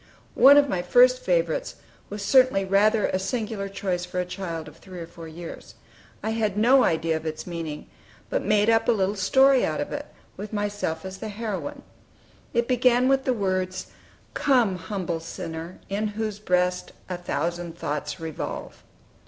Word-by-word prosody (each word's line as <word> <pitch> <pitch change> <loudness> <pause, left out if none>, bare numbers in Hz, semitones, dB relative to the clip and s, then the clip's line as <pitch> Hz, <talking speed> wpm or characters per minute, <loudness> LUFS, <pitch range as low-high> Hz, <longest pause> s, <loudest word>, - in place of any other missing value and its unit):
One 280 +2 +8
of 290 0 +5
my 185 -8 -1
first 250 +7 +5
favorites 170 -3 0 0.3
was 205 0 -5
certainly 255 -7 +4
rather 205 +3 +3
a 185 - 0
singular 215 -1 -3
choice 185 -2 -2
for 180 0 -4
a 180 - 0
child 175 -4 -5
of 150 - -13
three 185 -2 -11
or 170 - -5
four 165 0 -11
years. 165 +1 -9 0.5
I 220 - -1
had 215 -3 -1
no 255 +5 +5
idea 160 0 +1
of 160 - -5
its 155 0 -5
meaning, 165 -4 -6 0.4
but - - -1
made 210 -1 +3
up 225 0 +3
a - - +6
little 200 -1 0
story 265 +7 +4
out - - -1
of 290 - -3
it, 290 0 -5 0.3
with 210 +2 -7
myself 205 -5 -2
as 190 0 -7
the 220 - -5
heroine. 230 +7 -5 0.7
It 235 -1 +1
began 250 0 +3
with 270 0 +2
the 255 - +2
words 185 -2 -2 0.4
"Come, 240 -9 +2
humble 180 -3 -3
sinner, 165 +1 -7
in 205 +2 -1
whose 210 0 -4
breast 180 -2 0
A 185 - -3
thousand 175 0 -3
thoughts 150 0 -3
revolve." 160 -2 -6
195 Hz, 170 wpm, -25 LUFS, 175-225 Hz, 0.7 s, One